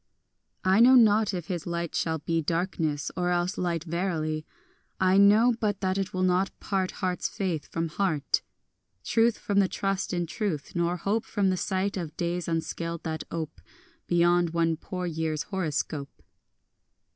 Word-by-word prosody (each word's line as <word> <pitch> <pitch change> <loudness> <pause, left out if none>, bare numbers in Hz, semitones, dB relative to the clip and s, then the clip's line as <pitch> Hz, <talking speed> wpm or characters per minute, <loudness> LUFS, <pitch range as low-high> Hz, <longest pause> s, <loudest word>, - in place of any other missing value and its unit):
3 185 - +2
I 195 - +5
know 250 +3 +8
not 215 -3 +5
if 180 -4 -4
his 175 -2 -4
light 170 -1 -3
shall 160 -1 0
be 165 +2 -1
Darkness, 160 -3 -1
or 180 -1 0
else 175 +2 0
light 170 -3 -1
verily: 160 -3 -2 0.5
I 185 0 +4
know 215 +5 +6
but 205 -3 0
that 190 0 0
it 195 -1 -2
will 185 0 -1
not 185 +1 +1
part 190 -2 -1 0.2
Heart's 180 -1 -1
faith 180 -7 -3
from 165 0 -2
heart, 165 -4 0 0.6
Truth 230 0 +2
from 200 -1 0
the 195 - +4
trust 195 0 -2
in 175 -1 -1
truth, 170 -5 -3
nor 175 +1 0
hope 210 +5 0
From 195 -3 +1
sight 190 +2 -1
of 165 -4 -5
days 175 0 -2
unscaled 165 0 -3
that 160 -1 -4
ope 160 -2 -5 0.5
Beyond 175 -1 +3
one 165 -1 +2
poor 180 +3 -5
year's 160 -2 -2
horoscope. 155 -6 -3
175 Hz, 160 wpm, -27 LUFS, 165-195 Hz, 0.6 s, know